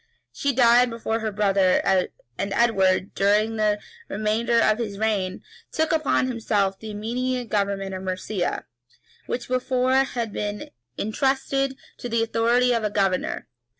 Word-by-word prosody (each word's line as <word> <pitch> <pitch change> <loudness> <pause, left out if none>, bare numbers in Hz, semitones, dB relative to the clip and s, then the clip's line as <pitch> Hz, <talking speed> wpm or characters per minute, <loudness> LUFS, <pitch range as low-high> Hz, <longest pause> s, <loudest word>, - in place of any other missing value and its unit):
[] - - -47
She 280 - 0
died 245 -1 +5
before 230 -1 -2
her 220 -1 -2
brother; 195 -2 +3
and 190 -2 +2 0.4
Edward, 195 -5 +2
during 210 +3 +2
the 210 -1 +2 0.3
remainder 215 +3 0
of 215 0 +3
his 210 -4 -3
reign, 200 -4 -1 0.3
took 320 -1 0
upon 310 -4 +2
himself 205 -5 0
the 220 - -8
immediate 240 +3 -3
government 200 -2 -1
of 185 - -5
Mercia, 185 0 -3 0.6
which 245 - -3
before 255 0 +1
had 240 -5 0
been 210 0 -4 0.3
intrusted 270 +4 0 0.2
to 245 - -5
the 230 0 +1
authority 240 +2 +2
of 230 -2 0
a 210 - +1
governor. 195 -3 -1
220 Hz, 145 wpm, -24 LUFS, 200-245 Hz, 0.6 s, died